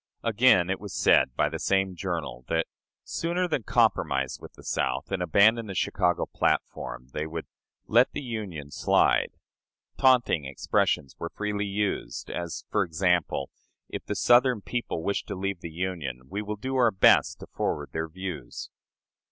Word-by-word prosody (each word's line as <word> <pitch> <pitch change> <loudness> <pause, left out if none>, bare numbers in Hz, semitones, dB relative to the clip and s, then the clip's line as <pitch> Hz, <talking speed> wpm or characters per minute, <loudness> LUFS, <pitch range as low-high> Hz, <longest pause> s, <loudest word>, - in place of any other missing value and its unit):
Again, 110 -5 +4
it 95 - -2
was 105 -1 -8
said 65 - +4
by - - +2
the - - -5
same 95 -1 +1
journal 85 -9 -4
that, 80 0 +1 0.4
"sooner 175 +2 -1
than 155 -6 -1
compromise 65 - +1
with - - -11
the - - -16
South - - -2
and 95 -2 -1
abandon 110 +6 +4
the 95 - -6
Chicago 90 -1 +1
platform," 60 - -2
they 75 +1 -2
would 80 0 -5 0.4
"let 120 +3 +4
the - - -5
Union 100 - -5
slide." - - +2 0.6
Taunting 125 - +4
expressions 70 0 0
were 85 - -4
freely 105 +1 -2
used 100 0 -2
as, 85 -1 -5
for 105 - +3
example, 85 -4 0 0.4
"If - - -5
the - - -2
Southern 125 -2 +4
people 120 -8 -3
wish 100 - -1
to 100 - -5
leave 95 -1 -3
the 85 - -6
Union, 80 -7 -4
we 100 - -3
will 105 0 -4
do 130 +5 -3
our 120 -2 +5
best 95 -4 +4
to - - -7
forward 75 -1 -3
their 80 0 -2
views." 85 -7 -7
95 Hz, 160 wpm, -27 LUFS, 80-105 Hz, 0.6 s, our